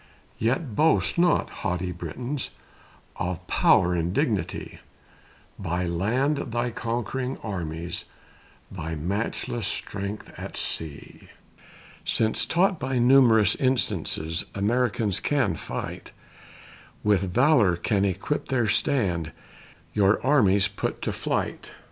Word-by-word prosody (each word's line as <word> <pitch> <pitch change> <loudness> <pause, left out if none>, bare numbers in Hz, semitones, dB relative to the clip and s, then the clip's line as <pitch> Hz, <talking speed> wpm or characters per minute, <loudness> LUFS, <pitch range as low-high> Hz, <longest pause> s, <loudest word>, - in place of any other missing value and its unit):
Yet 120 +1 0
boast 160 +3 +2
not, 175 0 +3
haughty 90 -2 -1
Britons, 120 - -5 0.7
Of 90 0 -3
power 90 0 +4
and 85 0 0
dignity, - - -1 0.8
By 90 -1 -1
land 115 - +1
thy 120 -2 -2
conquering 120 +3 -3
armies, 85 -4 -4 0.7
Thy 80 -3 -4
matchless 100 +5 -2
strength 100 +1 -4
at - - -7
sea; 80 -3 -6 0.7
Since 110 -1 +2
taught 180 0 +2
by 130 0 -1
numerous 120 -5 +6
instances 90 - 0
Americans 110 -1 +1
can 140 - +1
fight, 80 - -6 0.9
With 100 -3 +2
valor 125 - +4
can 100 +3 0
equip 100 +9 -1
their 125 -4 +1
stand, 100 - +1 0.6
Your 100 0 +3
armies 100 -8 +4
put 100 - -4
to - - -1
flight. - - -3
105 Hz, 105 wpm, -26 LUFS, 90-125 Hz, 0.9 s, numerous